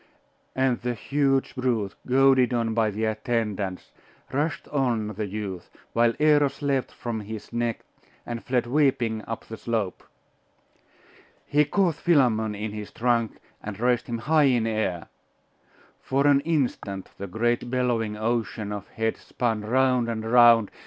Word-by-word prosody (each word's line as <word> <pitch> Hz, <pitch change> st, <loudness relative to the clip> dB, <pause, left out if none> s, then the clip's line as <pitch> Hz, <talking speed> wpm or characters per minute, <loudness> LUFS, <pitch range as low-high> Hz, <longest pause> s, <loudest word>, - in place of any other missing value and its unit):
And 130 Hz, -2 st, +1 dB
the 120 Hz, 0 st, -2 dB
huge 135 Hz, +1 st, 0 dB
brute, 120 Hz, -6 st, -1 dB
goaded 130 Hz, -1 st, +4 dB
on 115 Hz, -1 st, 0 dB
by 110 Hz, -1 st, +2 dB
the 105 Hz, +2 st, -2 dB
attendants, 110 Hz, -4 st, -2 dB, 0.4 s
rushed 145 Hz, 0 st, -1 dB
on 120 Hz, -7 st, 0 dB
the 105 Hz, 0 st, -4 dB
youth, 100 Hz, -3 st, -6 dB, 0.2 s
while 115 Hz, 0 st, +3 dB
Eros 145 Hz, -2 st, +3 dB
leaped 135 Hz, -2 st, 0 dB
from 115 Hz, -2 st, -4 dB
his 110 Hz, +1 st, -8 dB
neck, 120 Hz, -1 st, -1 dB, 0.4 s
and 120 Hz, -1 st, -5 dB
fled 125 Hz, -1 st, 0 dB
weeping 125 Hz, -5 st, +1 dB
up 115 Hz, -, -5 dB
the 110 Hz, -, -8 dB
slope. 110 Hz, -6 st, -2 dB, 1.4 s
He 150 Hz, +1 st, +3 dB
caught 180 Hz, +2 st, +2 dB
Philammon 120 Hz, -11 st, +2 dB
in 105 Hz, +1 st, -4 dB
his 105 Hz, -1 st, -6 dB
trunk 115 Hz, -2 st, 0 dB, 0.2 s
and 105 Hz, -1 st, -7 dB
raised 120 Hz, 0 st, +1 dB
him 120 Hz, -, -2 dB
high 150 Hz, +6 st, +3 dB
in 125 Hz, -4 st, +3 dB
air. 110 Hz, -6 st, -2 dB, 0.9 s
For 135 Hz, +2 st, 0 dB
an 145 Hz, -1 st, +5 dB
instant 130 Hz, -, -2 dB
the 100 Hz, -, -5 dB
great 120 Hz, +5 st, 0 dB
bellowing 120 Hz, -4 st, 0 dB
ocean 110 Hz, -2 st, -2 dB
of 105 Hz, -1 st, -5 dB
heads 110 Hz, 0 st, -2 dB
spun 115 Hz, -3 st, -2 dB
round 125 Hz, +1 st, +2 dB
and 110 Hz, -1 st, -3 dB
round. 120 Hz, -3 st, +6 dB
120 Hz, 145 wpm, -25 LUFS, 110-130 Hz, 1.4 s, round